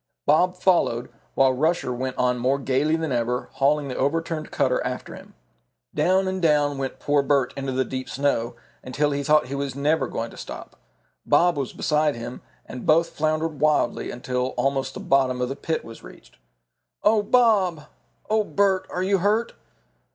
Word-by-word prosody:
Bob 180 +5 +3
followed, 170 -10 +1 0.2
while 135 -1 +4
Rusher 155 -1 0
went 130 +1 -4
on 125 0 +1
more 130 +3 +1
gayly 140 +3 +1
than 160 -3 -2
ever, 125 0 -1
hauling 145 +1 +1
the 130 - -5
overturned 155 +2 -1
cutter - - 0
after - - -5
him. - - -13 0.6
Down 190 +1 +2
and 185 0 -2
down 145 -3 +2
went 135 -1 -4
poor 145 0 +2
Bert 140 -2 +1
into 135 -1 -3
the 130 0 0
deep 130 -2 -5
snow, 125 -3 -1 0.3
until 145 +3 -1
he 140 0 -1
thought 150 +2 +3
he 130 - -7
was 140 -1 -3
never 145 -1 +1
going 115 0 -4
to - - -13
stop. - - -9 0.5
Bob 175 -1 +3
was 140 -3 -3
beside 150 -1 +1
him, 120 +1 -7 0.2
and 125 - -8
both 165 +2 +4
floundered 155 +1 0
around 150 - -13
wildly 150 -5 +1
until 125 +1 -3
almost 135 -1 -1
the - - -5
bottom 130 -2 +1
of 125 0 -1
the 135 - -4
pit 160 +2 -3
was 115 - -11
reached. - - -15 0.7
"Oh, 215 0 +4
Bob!" 205 -9 +2 0.4
"Oh, 215 0 +2
Bert! 200 -2 +1
Are 180 - -2
you 195 0 +2
hurt?" 210 +5 +1
145 Hz, 180 wpm, -24 LUFS, 130-165 Hz, 0.7 s, while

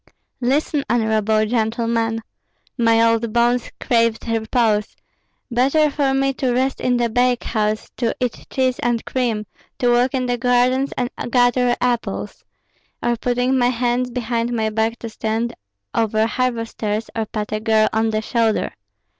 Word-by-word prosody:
"Listen, 280 +3 +1
honorable 220 -2 +2
gentlemen. 230 0 0 0.5
My 230 -2 +4
old 230 0 +1
bones 240 +1 +2
craved 230 -2 +1
repose; 220 -1 0 0.6
better 275 +5 +3
for 275 -2 +1
me 270 0 +1
to 255 -2 +2
rest 260 +2 0
in 250 -1 +2
the 240 -1 +1
bakehouse, 225 -3 0
to 235 -3 0
eat 250 -2 -3
cheese 260 -1 0
and 240 -1 -1
cream, 230 -5 -1 0.3
to 245 -1 +2
walk 245 +2 +2
in 255 -1 0
the 245 -1 -1
gardens 255 +2 +2
and 245 0 -1 0.2
gather 245 0 +3
apples, 245 -2 -2 0.6
or 240 0 +2
putting 245 +2 0
my 245 0 +3
hands 245 0 0
behind 235 -1 -2
my 220 -2 0
back 220 +2 0
to 230 - -7
stand 225 +1 -2 0.4
over 220 -1 +1
harvesters 230 -3 -2
or 220 -1 -2
pat 210 0 -4
a 215 - -1
girl 220 0 +3
on 220 +1 +2
the 215 0 -1
shoulder. 225 -1 0
235 Hz, 145 wpm, -20 LUFS, 225-250 Hz, 0.6 s, My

